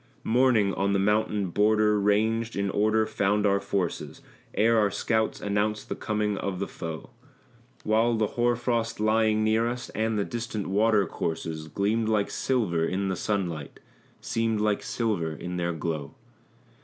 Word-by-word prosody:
Morning 115 -5 +3
on 100 0 0
the - - +3
mountain 105 -1 +1
border 105 +1 +3
ranged 110 +3 +1
in 100 -1 -1
order 110 +1 +2
found 105 -1 +1
our 100 -1 +3
forces, 100 -3 -3 0.3
Ere 115 +2 +4
our 105 -1 +3
scouts 110 +2 0
announced 105 +1 -1
the - - -2
coming 105 -1 -1
of 95 -2 -3
the 100 - -3
foe; 80 -2 -7 0.7
While 115 +2 +2
the 110 -2 0
hoar 120 0 +2
frost 120 -2 -1
lying 110 0 +2
near 110 +1 +2
us, 120 0 -4
and 110 0 -1
the 100 - 0
distant 115 -3 -4
water 105 +1 +3
courses, 80 -1 -4
Gleamed 105 +6 0
like 105 -2 +1
silver 105 -11 0
in 95 +3 -1
the 95 - -1
sunlight, 85 -7 -3 0.4
seemed 115 -1 -1
like 105 -1 +1
silver 100 -9 -1
in 90 +4 -5
their 85 0 -1
glow. 80 -3 -4
105 Hz, 155 wpm, -27 LUFS, 100-110 Hz, 0.7 s, Ere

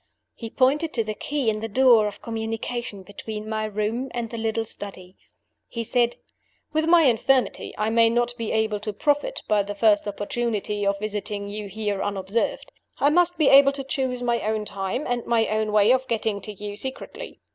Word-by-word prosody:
"He 230 - -7
pointed 285 +7 +2
to 230 - +2
the 215 0 -4
key 285 +4 -3
in 215 -1 +1
the 225 - -3
door 235 -1 +5
of 205 - -8
communication 225 -1 -4
between 210 +2 -7
my 215 0 -2
room 215 +5 -2
and 235 -2 -3
the 230 - -5
little 225 0 -1
study. 190 -3 -8 0.5
"He 230 - -4
said, 240 +1 +1 0.6
'With 315 +1 +1
my 335 0 +6
infirmity, 255 0 +2
I 215 +1 0
may 230 0 +5
not 240 +1 +1
be 230 -2 -4
able 220 -1 0
to 210 0 -4
profit 290 - 0
by 210 -1 +3
the 205 +1 -5
first 210 0 +3
opportunity 205 0 -2
of 200 0 +1
visiting 205 0 -4
you 210 0 -5
here 205 -1 -3
unobserved. 200 +2 -2 0.3
I 285 - +3
must 350 +1 +3
be 305 -3 +4
able 275 0 +7
to 275 0 -3
choose 260 -2 -2
my 240 -1 +1
own 215 0 -1
time 195 +7 -3
and 245 -1 -1
my 230 -1 +3
own 215 0 0
way 210 +2 +5
of 260 0 0
getting 220 -3 -1
to 215 - -7
you 205 0 -7
secretly. 265 - -7
225 Hz, 190 wpm, -24 LUFS, 210-250 Hz, 0.6 s, able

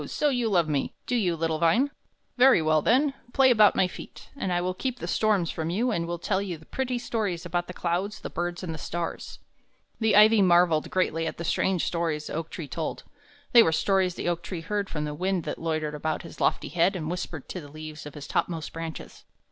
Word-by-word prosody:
so 300 - +1
you 245 -4 0
love 175 -5 +3
me, 145 -3 -1
do 250 - -1
you, 185 -8 +1
little 160 -1 -1
vine? 235 +12 +3 0.4
Very 255 -4 +6
well, 155 -1 +2
then; 270 - +3 0.2
play 265 -1 +5
about 215 -3 +6
my 185 - +3
feet, - - -11
and 190 -9 -3
I 175 - +2
will 180 +1 -1
keep 250 +6 -3
the - - -6
storms 205 -6 +1
from 160 0 -3
you 230 +8 0
and 170 -5 -1
will 175 0 -3
tell 190 +3 -1
you 185 -4 -4
pretty 250 +10 -3
stories 210 -7 -2
about 175 0 -2
the - - -6
clouds, 180 +5 -2
the - - -5
birds, 175 +1 -3
and 165 -3 -4
the 160 - -7
stars." 170 +3 -5 0.6
The 220 -1 +3
ivy 215 +1 +7
marvelled 175 -4 +4
greatly 165 -3 0
at - - -5
the 170 - -5
strange 185 +1 +1
stories 165 -3 -1
the - - -6
oak 165 +1 -3
tree 165 -5 -6
told; 160 +3 -4 0.5
they 240 - +9
were 160 - +4
stories 185 +1 +1
the - - -4
oak 175 -1 0
tree 170 -1 -6
heard 200 +3 -2
from 150 -1 -3
the 150 - -4
wind 185 +2 -1
that - - -5
loitered 155 -2 -2
about 155 +1 -2
his 165 - -11
lofty - - +1
head 175 +3 +2
and 160 -4 -4
whispered 175 -5 -5
to 180 - -5
the 145 - -11
leaves 155 0 -8
of 145 - -11
his 145 -1 -7
topmost 165 0 -2
branches. 165 -1 -7
175 Hz, 230 wpm, -27 LUFS, 160-205 Hz, 0.6 s, they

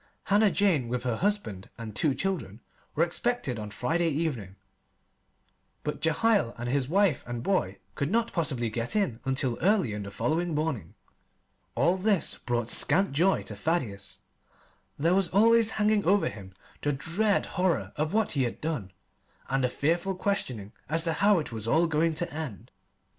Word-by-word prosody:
Hannah 205 +1 +4
Jane, 185 -12 +2
with 120 0 -2
her 125 -3 0
husband 195 - -1
and 110 -2 -7
two 145 +1 +2
children, 165 - -3 0.3
were 160 - +4
expected 175 - -1
on 105 -1 -5
Friday 165 +11 0
evening; 140 - -2 1.3
but 150 - -4
Jehiel 165 - +2
and 120 +1 -4
his 130 +1 0
wife 190 -4 +2
and 120 -1 -4
boy 100 - 0 0.2
could 140 +7 -2
not 230 +3 +1
possibly 130 -9 0
get 115 - -2
in 170 - 0
until 130 -2 0
early 185 - +3
on 105 - -4
the 100 - -6
following 160 - -1
morning. 150 - -2 0.8
All 180 +2 +3
this 200 -1 +1
brought 120 -2 -2
scant 190 +5 +3
joy 175 +7 +2
to - - -8
Thaddeus. 120 - -2 0.8
There 165 +5 +2
was 195 -1 +3
always 225 +4 +4
hanging 210 -1 +3
over 200 +3 +3
him 95 -2 -11 0.3
the 145 - 0
dread 180 +10 +1
horror 165 - 0
of 155 +2 -1
what 220 0 +1
he 140 - 0
had 120 -2 -2
done, 135 - -3 0.6
and 135 0 +1
the 125 - +2
fearful 170 +8 0
questioning 130 - -2 0.2
as 165 +1 +1
to 165 -1 +1
how 200 +5 +4
it 155 -6 -3
was 110 -1 -5
all 160 +8 +4
going 160 0 +1
to 175 +1 -3
end. 150 - -6
155 Hz, 170 wpm, -28 LUFS, 120-190 Hz, 1.3 s, Hannah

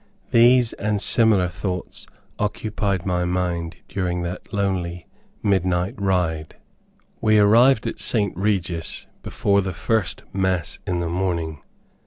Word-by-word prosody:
These, 120 0 +5
and 105 0 -1
similar 105 -4 +3
thoughts 90 0 -5 0.3
occupied 105 -2 -1
my 90 -2 0
mind 90 -2 -2
during 90 -2 -2
that 85 +3 -6
lonely 90 -4 -2 0.4
midnight 95 -3 +1
ride. 90 -5 -1 0.7
We 110 -1 +4
arrived 115 +4 +5
at - - -4
St. 105 -5 0
Regis 95 -4 -1 0.2
before 100 0 +1
the 95 -1 -3
first 90 +5 -1
Mass 95 -3 0
in 90 -1 0
the 85 - -1
morning. 85 -3 -2
95 Hz, 120 wpm, -22 LUFS, 90-105 Hz, 0.7 s, These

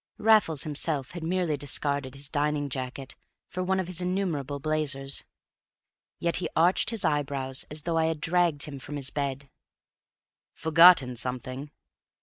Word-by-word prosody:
Raffles 210 -9 +4
himself 145 -2 -3
had 175 - -7
merely 170 -2 0
discarded 140 -1 -2
his 140 +1 -7
dining 145 0 0
jacket 130 +1 -5 0.3
for 185 - -4
one 190 +1 +1
of 185 - -1
his 180 0 -3
innumerable 170 -7 -2
blazers. 140 -2 -1 0.9
Yet 170 0 0
he 180 - -3
arched 175 +3 +4
his 220 -5 -2
eyebrows 140 -3 0
as 150 0 -7
though 165 -1 0
I 160 - +3
had 160 -1 -1
dragged 170 -3 +2
him 140 -3 -7
from 145 +3 -7
his 140 -1 -3
bed. 140 -1 -3 1.1
"Forgotten 160 -6 +6
something?" 130 +3 -5
150 Hz, 145 wpm, -27 LUFS, 140-170 Hz, 1.1 s, Forgotten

